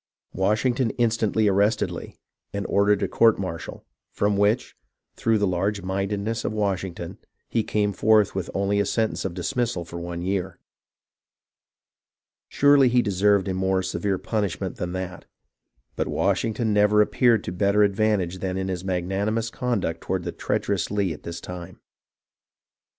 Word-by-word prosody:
Washington 110 +6 +1
instantly 110 -2 +2
ar 100 - +3
rested 100 +4 +2
Lee, - - -8 0.4
and 100 -1 -3
ordered 100 0 +2
a - - +1
court 115 -2 +4
martial, 90 -4 -6 0.3
from 105 0 +1
which, 105 +4 +1 0.4
through 115 -1 +2
the 105 - +1
large 100 +2 -1
mindedness 100 +4 -2
of - - -1
Washington, 95 -3 -3 0.3
he 115 - +1
came 105 -1 0
forth 110 0 +3
with 95 -2 -3
only 100 +1 +1
a 100 - +2
sentence 110 -3 -1
of 90 -3 -3
dismissal 95 0 -2
for 85 +1 -7
one 85 0 -5
year. 95 0 -2 1.9
Surely 140 -2 +5
he 120 0 +3
deserved 100 0 +2
a 95 - -1
more 95 0 0
severe 95 +1 -1
punishment 105 -3 -2
than 90 0 -4
that, 90 -1 -5 0.7
but - - -1
Washing 110 -2 0
ton 110 -1 0
never 105 +1 +5
appeared 115 -1 +2
to - - -4
better 100 +3 +3
advantage 100 -3 +1
than 95 0 -2
in 95 0 -2
his 90 -1 -3
mag 90 -2 -1
nanimous 110 +4 -1
conduct 110 -11 -2
toward 95 -1 -2
the - - -3
treacherous 95 -3 -1
Lee 100 -4 0
at 75 - -11
this 85 +1 -6
time. 90 0 -9
100 Hz, 155 wpm, -24 LUFS, 95-110 Hz, 1.9 s, Surely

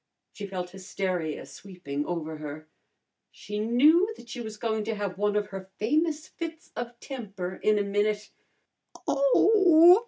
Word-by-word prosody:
She 205 -2 -6
felt 180 -2 -4
hysteria 185 -4 -3
sweeping 155 -7 -6
over 160 -2 -3
her. 150 +1 -7 0.6
She 210 0 -6
knew 295 - +5
that 235 - -14
she 240 +1 -5
was 220 -2 -6
going 220 -1 -1
to 225 0 -1
have 200 -3 -3
one 205 0 +2
of 210 0 0
her 190 -1 -7
famous 305 +6 +1
fits 330 0 -7
of 240 0 -5
temper 200 -9 -6
in 215 0 +4
a 205 - +2
minute. 205 +1 0 0.8
"Oh! 350 - +7
210 Hz, 150 wpm, -28 LUFS, 190-270 Hz, 0.8 s, Oh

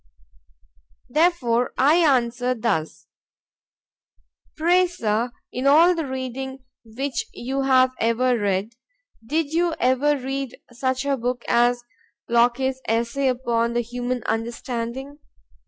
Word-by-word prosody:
——Therefore 255 -7 +1
I 295 +5 +5
answer 250 -5 +2
thus: 210 -9 -2 1.5
Pray, 355 +3 +4
Sir, 230 -8 -1 0.2
in 255 +2 -1
all 325 +5 +6
the 325 -4 -3
reading 265 0 -5 0.2
which 270 - -4
you 265 +3 -3
have 260 -1 +4
ever 245 +2 +2
read, 205 0 -1 0.5
did 305 +5 -1
you 340 0 +1
ever 260 +4 +2
read 270 -1 -4
such 260 +2 -2
a 280 -1 +1
book 245 0 -3
as 240 +1 +2 0.4
Locke's 245 +3 +2
Essay 235 +5 0
upon 235 -2 0
the 240 - +1
Human 245 +1 -4
Understanding? 235 +4 -4
255 Hz, 110 wpm, -23 LUFS, 235-275 Hz, 1.5 s, all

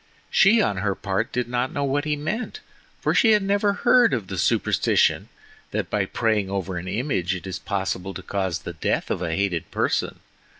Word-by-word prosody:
She 215 +2 +5
on 100 - 0
her 100 +1 0
part 100 +3 -2
did 125 -2 -1
not 125 +1 -1
know 145 - -2
what 140 +2 0
he 150 -1 0
meant, 215 - -4 0.4
for - - +1
she 225 -3 +5
had 210 -2 +3
never 200 +1 +2
heard 245 - +5
of 105 -6 -5
the 95 - -4
superstition - - +2 0.4
that - - -3
by - - +1
praying 110 -4 0
over 95 -2 -3
an 90 +1 -6
image 95 - -1
it 95 - -8
is 95 - -5
possible 95 -1 -3
to 90 - -7
cause 95 -3 -2
the - - -7
death - - -1
of - - -1
a 80 -1 -1
hated 95 -4 -1
person. - - -1
105 Hz, 200 wpm, -24 LUFS, 95-150 Hz, 0.4 s, She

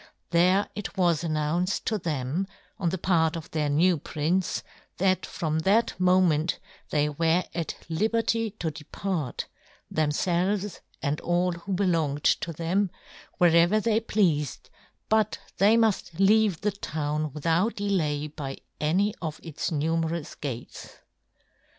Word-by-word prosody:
There 185 +4 +4
it 210 -1 -6
was 175 -3 +2
announced 165 +3 0
to 215 -2 0
them, 155 +2 -2 0.3
on 175 - +1
the 190 - -2
part 165 -3 +2
of 165 -2 -7
their 150 -2 0
new 165 +3 +3
prince, 165 +7 -1 0.3
that 185 0 +1
from 160 -3 -2
that 200 +8 +3
mo 185 0 +5
ment 160 -2 +2 0.3
they 150 0 +2
were 165 +4 +2
at 165 -1 -3
Hberty 225 +4 0
to 165 -5 -2
depart, 155 0 -4 0.5
themfelves, 180 +6 0 0.2
and 150 0 -1
all 175 +1 +1
who 175 +3 -5
belonged 165 -6 +1
to 170 - +2
them, 175 +5 0 0.5
wherever 175 +4 +5
they 220 0 +2
pleafed, 175 - 0 0.4
but 215 -1 +2
that - - -26
they 210 +4 +6
muft 215 -7 +1
leave 200 -2 +4
the 210 - +1
town 155 -5 -3
with 150 +2 -9
out 170 +7 +2
delay 165 -8 0
by 145 -2 -6 0.2
any 190 +7 +2
one 165 - -3
of 155 0 -6
its 160 -3 -3
nume 160 +1 0
rous 165 -2 -4
gates. 125 -4 -7
170 Hz, 145 wpm, -27 LUFS, 155-195 Hz, 0.5 s, they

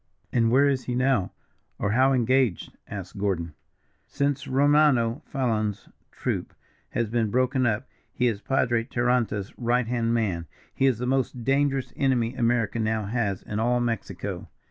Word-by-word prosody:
"And 115 -2 +3
where 135 +4 +5
is 135 -2 0
he 125 - -2
now, 125 -6 +1 0.5
or 100 - -1
how 130 +4 +4
engaged?" 130 -5 +1
asked 100 0 -7
Gordon. 85 -5 -1 0.5
"Since 140 -1 -1
Romano 140 -3 +3
Fallon's 110 -6 -1 0.2
troop - - -3 0.3
has 120 -1 -1
been 115 -2 +1
broken 130 +2 +2
up, 115 +3 -1 0.2
he 125 - 0
is 110 -4 0
Padre 120 -3 +1
Taranta's 120 -5 0
right 120 0 +1
hand 115 -1 0
man. 90 -8 -1 0.3
He 135 - +2
is 130 -5 +2
the 125 - -3
most 130 -2 -1
dangerous 135 +1 +1
enemy 125 -4 +1
America 115 -3 0
now 110 -1 0
has 100 -3 -1
in 105 - -4
all 120 +2 +2
Mexico." 115 -3 -3
120 Hz, 150 wpm, -26 LUFS, 110-130 Hz, 0.5 s, where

